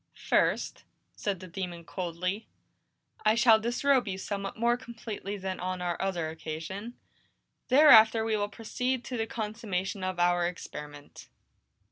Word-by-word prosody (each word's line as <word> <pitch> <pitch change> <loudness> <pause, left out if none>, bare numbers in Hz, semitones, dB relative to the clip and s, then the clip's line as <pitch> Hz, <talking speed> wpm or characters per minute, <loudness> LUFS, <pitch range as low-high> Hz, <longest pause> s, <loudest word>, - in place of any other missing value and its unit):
"First," - - +1 0.3
said 195 -3 -3
the 185 - -8
demon 175 -2 -6
coldly, 185 +4 -3 0.8
"I 215 +1 +4
shall 230 -2 +6
disrobe 245 +3 +2
you 190 -1 -3
somewhat 195 +1 -4
more 235 +1 +3
completely 230 -4 -6
than 190 -1 -4
on 185 0 -3
our 175 -1 -2
other 175 -5 -1
occasion. 165 +8 -6 0.7
Thereafter 230 -5 +7
we 225 -1 +1
will 205 -1 -1
proceed 250 +4 -2
to 250 - -5
the 225 0 -1
consummation 210 -4 -3
of 185 -1 -2
our 175 0 +3
experiment." 150 -4 -9
200 Hz, 135 wpm, -29 LUFS, 180-225 Hz, 0.8 s, Thereafter